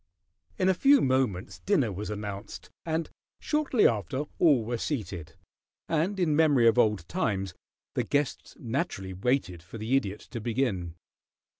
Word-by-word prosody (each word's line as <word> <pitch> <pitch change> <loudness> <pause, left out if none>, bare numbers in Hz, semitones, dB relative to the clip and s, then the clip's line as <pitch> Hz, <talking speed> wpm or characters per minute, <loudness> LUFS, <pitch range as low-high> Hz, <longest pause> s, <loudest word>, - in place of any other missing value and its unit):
In 185 - +2
a 190 - +5
few 275 +9 +5
moments 130 - 0
dinner 150 - +1
was 100 +3 -5
announced, 105 -1 -6 0.2
and 160 0 0 0.3
shortly 300 -6 +3
after 110 - -1 0.2
all 140 -10 +4
were 120 +1 -2
seated, 95 - -4 0.5
and 170 +5 0
in 160 -5 +2
memory 145 -7 +5
of 115 +2 +4
old 105 -7 +2
times 100 - -1 0.4
the - - +1
guests 145 -1 -2
naturally 115 - -3
waited 95 -4 -1
for 90 +7 -10
the 110 +5 0
Idiot 105 -6 -1
to 120 -2 -5
begin. 105 -8 -1
120 Hz, 145 wpm, -28 LUFS, 100-150 Hz, 0.5 s, a